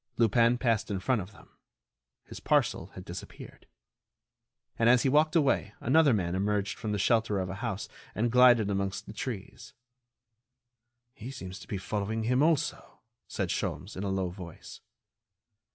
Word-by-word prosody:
Lupin 115 Hz, +1 st, +4 dB
passed 115 Hz, -4 st, 0 dB
in 100 Hz, -2 st, -2 dB
front 120 Hz, +3 st, +1 dB
of 95 Hz, +3 st, -9 dB
them. -, -, -18 dB, 0.8 s
His -, -, -9 dB
parcel -, -, +1 dB
had -, -, -9 dB
disappeared. -, -, -10 dB, 1.1 s
And 115 Hz, 0 st, +4 dB
as 125 Hz, 0 st, +5 dB
he 135 Hz, -, +3 dB
walked 155 Hz, +3 st, +3 dB
away 135 Hz, -, +2 dB
another 145 Hz, +3 st, +4 dB
man 90 Hz, -6 st, 0 dB
emerged 100 Hz, +1 st, 0 dB
from 110 Hz, -, -3 dB
the 105 Hz, -, 0 dB
shelter 110 Hz, 0 st, +2 dB
of 90 Hz, -1 st, -3 dB
a 95 Hz, -, -7 dB
house -, -, -3 dB, 0.3 s
and 115 Hz, +2 st, 0 dB
glided 120 Hz, -4 st, +6 dB
amongst 100 Hz, 0 st, -2 dB
the -, -, -9 dB
trees. 110 Hz, -4 st, -7 dB, 1.4 s
"He 115 Hz, +1 st, -9 dB
seems 95 Hz, -8 st, -8 dB
to -, -, -13 dB
be 100 Hz, -, -3 dB
following 105 Hz, +3 st, -3 dB
him 125 Hz, +4 st, +2 dB
also," 155 Hz, -2 st, 0 dB, 0.3 s
said -, -, -3 dB
Sholmes, 95 Hz, +3 st, -3 dB
in 95 Hz, -, -5 dB
a 100 Hz, -, -2 dB
low 95 Hz, -1 st, -1 dB
voice. 90 Hz, -2 st, -10 dB
110 Hz, 160 wpm, -29 LUFS, 100-125 Hz, 1.4 s, glided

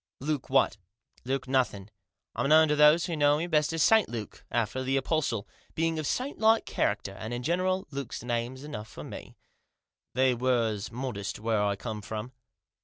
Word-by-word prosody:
" -, -, -68 dB
Luke 150 Hz, -4 st, -2 dB
what?" 135 Hz, -4 st, +3 dB, 0.3 s
" -, -, -33 dB
Luke 135 Hz, +1 st, -2 dB
nothing. 120 Hz, -7 st, 0 dB, 0.4 s
I'm 140 Hz, -, 0 dB
known 160 Hz, +1 st, +7 dB
to 150 Hz, -, +3 dB
those 150 Hz, +3 st, +6 dB
who 170 Hz, -, -2 dB
knew 145 Hz, -1 st, +4 dB
me 165 Hz, -, -1 dB
best 155 Hz, -3 st, +2 dB
as 165 Hz, -1 st, +1 dB
St 220 Hz, -2 st, +5 dB
Luke, 110 Hz, -4 st, -7 dB
after 120 Hz, +2 st, -1 dB
the 135 Hz, +1 st, 0 dB
apostle, 135 Hz, -6 st, -1 dB, 0.3 s
being 165 Hz, 0 st, 0 dB
of 155 Hz, -, -2 dB
saintlike 225 Hz, -4 st, +2 dB
character, 100 Hz, -1 st, -1 dB
but 110 Hz, +1 st, -5 dB
in 120 Hz, +1 st, -3 dB
general 185 Hz, +5 st, 0 dB
Luke's 135 Hz, -5 st, -5 dB
name 120 Hz, +1 st, -2 dB
enough 130 Hz, -6 st, -7 dB
for -, -, -10 dB
me. -, -, -9 dB, 0.8 s
They 130 Hz, 0 st, +4 dB
was 115 Hz, -4 st, 0 dB
modest 115 Hz, -6 st, -4 dB
where 110 Hz, -1 st, +1 dB
I 100 Hz, -1 st, +1 dB
come 110 Hz, +1 st, -5 dB
from." 110 Hz, +3 st, -6 dB
130 Hz, 180 wpm, -28 LUFS, 110-155 Hz, 0.8 s, known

